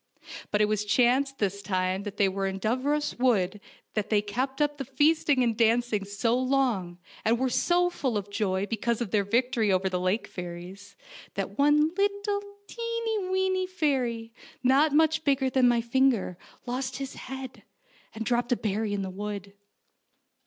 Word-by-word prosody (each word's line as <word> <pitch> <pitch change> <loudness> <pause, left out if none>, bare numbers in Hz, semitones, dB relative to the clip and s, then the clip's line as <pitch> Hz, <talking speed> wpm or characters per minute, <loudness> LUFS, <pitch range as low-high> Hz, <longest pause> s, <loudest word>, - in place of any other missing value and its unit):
But 210 - +1
it 210 0 +3
chanced 250 +6 +2
that 205 - +2
this 200 +1 -4
time 185 -1 -1
they 200 -1 0
were 195 0 -1
in 190 0 -3
Dooros 265 +8 0
Wood 210 -6 +2 0.3
they 210 0 +1
kept 260 +7 -3
up 295 -1 +1
the - - -1
feasting 290 0 +2
and 230 -2 +1
dancing 230 -2 +2
so 205 +4 0
long, 250 -9 0 0.3
and 230 +2 +3
were 260 +1 0
so 355 +6 +2
full 260 -9 -1
of 205 0 -5
joy 195 -2 0
because 230 +1 -1
of 235 -5 -3
their 210 -2 +2
victory 230 0 +1
over 190 0 +2
the 180 -1 -1
lake 185 +5 0
fairies, 180 +3 -8 0.4
that 195 +3 -4
one 295 +2 +5
lit 405 +1 +3
tle, 405 -1 -1 0.9
weeny 375 0 +1
fairy, 250 -10 -1 0.3
not 275 +4 +4
much 315 +1 +3
bigger 270 -3 +2
than 255 -1 +4
my 240 -1 +3
finger, 235 -6 +1 0.3
lost 255 +1 -3
his 275 -1 -5
head, 265 -1 -8 0.5
and 225 0 -4
dropped 240 +1 0
a 245 - +3
berry 210 0 -1
in 200 -1 -1
the 190 - -5
wood. 200 0 -6
235 Hz, 165 wpm, -27 LUFS, 200-270 Hz, 0.9 s, one